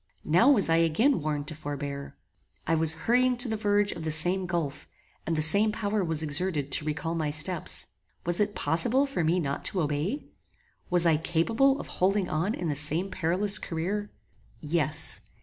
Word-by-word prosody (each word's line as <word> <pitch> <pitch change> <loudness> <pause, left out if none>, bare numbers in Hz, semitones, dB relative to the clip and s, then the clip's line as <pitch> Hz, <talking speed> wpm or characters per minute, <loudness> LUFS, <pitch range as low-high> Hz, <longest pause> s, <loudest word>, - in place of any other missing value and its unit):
Now 180 - +4
was 230 -10 +5
I 165 0 +2
again 165 - +2
warned 145 -1 -3
to - - -6
forbear. 145 -2 -6 0.5
I - - 0
was 160 0 +1
hurrying 250 +1 +2
to 245 - +1
the 220 - -2
verge 205 -1 +1
of 165 - -7
the 160 - -2
same 180 +4 +5
gulf, 165 -5 -4 0.4
and 165 - 0
the 155 - 0
same 200 +7 +4
power 210 -1 -2
was 160 -2 -1
exerted 150 -2 -2
to 150 - +1
recall 155 +2 -3
my 160 -3 -2
steps. 155 +3 +1 0.4
Was 175 0 0
it 210 0 0
possible 235 +12 +1
for 275 -11 -3
me 165 +3 +1
not 140 -4 -3
to 185 - -1
obey? 155 - -3 0.6
Was 175 -1 +3
I 165 -2 +4
capable 225 - +1
of - - -6
holding 195 +1 0
on 170 +8 -1
in 175 - -4
the 150 - -1
same 155 +6 +2
perilous 185 +3 +1
career? 195 +6 -4 0.5
Yes. 155 -1 0
170 Hz, 185 wpm, -27 LUFS, 155-205 Hz, 0.6 s, was